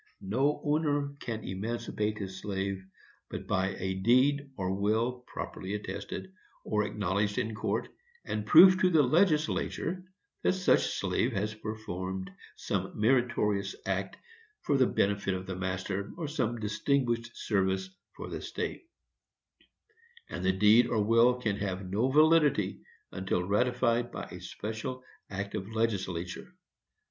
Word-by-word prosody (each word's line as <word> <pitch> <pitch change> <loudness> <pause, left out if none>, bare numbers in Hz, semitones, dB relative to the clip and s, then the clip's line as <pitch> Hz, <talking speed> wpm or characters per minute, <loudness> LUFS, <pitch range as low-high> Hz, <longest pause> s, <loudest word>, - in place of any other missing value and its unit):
No 135 +9 +1
owner 145 -2 +1
can 110 -3 -4
emancipate 105 +2 -3
his 95 -2 -6
slave, 95 -1 -3 0.5
but - - -6
by 95 +1 0
a 95 0 -2
deed 130 +8 +3
or 95 -1 -1
will 110 +5 0
properly 95 +2 -5
attested, 145 - -6 0.3
or 105 -1 +1
acknowledged 100 0 -1
in 110 - -1
court, 110 - -1 0.4
and 105 - -2
proof 185 +6 +9
to 185 - +5
the 160 -4 +5
legislature 160 +3 +1 0.4
that - - +3
such 185 -1 +2
slave 100 +6 0
has 105 +1 -1
performed 95 -4 -5 0.2
some - - -3
meritorious 105 -4 +2
act 95 0 -2 0.5
for 145 - +1
the 130 -2 +4
benefit 100 -1 +1
of 95 0 -5
the 95 0 -4
master, 95 +2 -3
or 165 -3 -3
some 120 -6 -1
distinguished 120 +2 0
service 95 -2 0 0.2
for - - -7
the - - -5
state; - - -4 1.5
and - - -4
the 95 - +4
deed 105 +5 +5
or 110 -3 +1
will 115 +3 +5
can 105 -5 -1
have 95 -2 -3
no 105 +8 +1
validity 150 - +4 0.3
until 95 -1 -1
ratified 120 +3 +1
by - - -7
special 110 +4 -5 0.3
act 100 +1 -4
of 95 +2 -4
legislature. 95 -6 -2
110 Hz, 135 wpm, -30 LUFS, 95-125 Hz, 1.5 s, proof